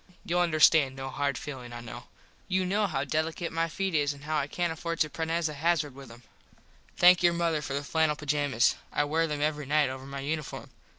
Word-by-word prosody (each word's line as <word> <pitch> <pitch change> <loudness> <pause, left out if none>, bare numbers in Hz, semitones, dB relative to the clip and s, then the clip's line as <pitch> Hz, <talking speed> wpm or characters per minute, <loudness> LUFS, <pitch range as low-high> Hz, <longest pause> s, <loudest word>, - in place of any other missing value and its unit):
Youll 175 +1 0
understand 155 -4 +4
no 135 0 -6
hard 140 0 -1
feelin 130 -4 -7
I 120 - -6
know. 120 -1 -9 0.4
You 185 0 +1
know 205 +3 +1
how 140 -6 -2
delicate 160 +4 -2
my 165 +1 0
feet 195 +2 -2
is 145 -2 +2
an 140 0 -14
how 155 +1 -2
I 145 -2 0
cant 175 +2 -1
afford 170 +1 -4
to 155 -2 +1
prennez 165 +1 -1
a 155 - -5
hazard 150 -1 0
with 135 0 -11
them. 120 +1 -14 0.7
Thank 180 0 +7
your 175 -1 +4
mother 170 -2 0
for 140 -2 -4
the 140 - -2
flannel 160 +1 +1
pajammas. 145 -4 +1 0.2
I 145 - +1
wear 160 +3 +1
them 150 -1 -3
every 150 -1 -1
night 150 -1 +3
over 130 0 -8
my 140 0 -6
uniform. 150 +1 -4
150 Hz, 220 wpm, -28 LUFS, 140-165 Hz, 0.7 s, Thank